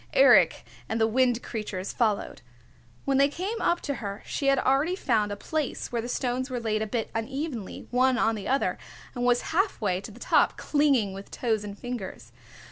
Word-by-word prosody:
Eric - - +6 0.2
and 225 - -1
the 220 - +4
Wind 245 +1 +2
Creatures 210 -4 -4
followed. 215 -4 0 0.6
When 275 -1 +2
they 280 - +6
came 375 +10 -4
up 345 - +2
to 285 - -2
her 200 -1 -5
she 275 - -2
had 275 0 +5
already 275 +7 +2
found 220 - +1
a - - -2
place 300 +6 -3
where 235 -1 -1
the 240 - -6
stones 255 +1 -1
were 250 -1 -2
laid 215 -2 -1
a 220 - -1
bit 225 0 -2
unevenly, 250 - -4
one 255 +1 +3
on 225 -1 +2
the 205 -3 -5
other, 270 +1 +1 0.3
and 245 - -3
was 245 0 +3
half 385 +4 +1
way 190 -4 0
to - - -8
the 220 +3 -13
top, - - +3
clinging 275 -9 +2
with 195 +1 -9
toes 220 -4 -1
and 205 -1 -7
fingers. 245 -5 -6
245 Hz, 200 wpm, -27 LUFS, 215-275 Hz, 0.6 s, Eric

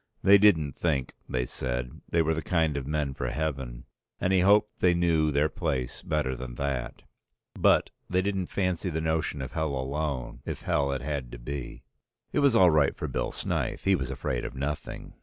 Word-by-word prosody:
They 100 +1 +8
didn't 80 -10 +4
think, 70 -6 -1 0.2
they 60 -1 0
said, 60 0 -4
they 85 -1 +3
were 80 +1 +1
the 80 - -2
kind 80 -3 +1
of 70 -2 -3
men 75 -2 -1
for 65 -2 -3
Heaven, 65 -4 -3 0.3
and 90 - +1
he 95 - +5
hoped 105 +3 +4
they 90 -1 +4
knew 85 -3 +3
their 75 +2 +3
place 70 -7 -3
better 75 -4 -1
than - - -7
that, 70 -2 -3 0.5
but - - +3 0.2
they 90 0 +2
didn't 95 -2 -1
fancy 90 -1 -1
the 80 -1 -2
notion 80 -3 -1
of 65 - -6
Hell 80 -3 -1
alone, 70 0 -3
if - - -5
Hell 70 -1 +1
it 70 0 -2
had 70 -4 -3
to - - -6
be. 65 +2 -6 0.5
It - - +2
was 140 -4 +4
all 90 -5 +7
right 75 -3 +3
for - - -3
Bill - - -2
Snyth, - - -2
he 95 - +4
was 65 -8 -1
afraid 60 -2 -2
of - - -6
nothing. 70 +2 -4
75 Hz, 195 wpm, -28 LUFS, 65-85 Hz, 0.5 s, They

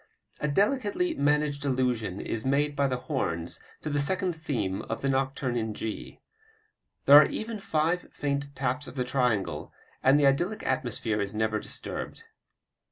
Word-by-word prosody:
A 150 - 0
delicately 235 - +1
managed 145 - +1
allusion 125 -7 0
is 110 - -3
made 145 +2 +1
by 140 0 +2
the 130 -1 -1
horns 85 - -2 0.2
to 155 - -3
the 145 - +1
second 180 +5 +1
theme 115 -12 -2
of - - -3
the 140 - 0
nocturne 135 -1 0
in 110 -2 -2
G. 110 -1 -5 0.9
There 145 - +10
are 150 - +8
even 220 0 -4
five 165 -1 0
faint 140 0 -3
taps 130 +2 -1
of - - -9
the 125 - 0
triangle, 125 - 0 0.3
and 135 +2 +5
the 145 - +4
idyllic 175 +10 +1
atmosphere 115 -6 0
is 100 +1 -2
never 110 0 +1
disturbed. - - -6
140 Hz, 160 wpm, -28 LUFS, 120-150 Hz, 0.9 s, There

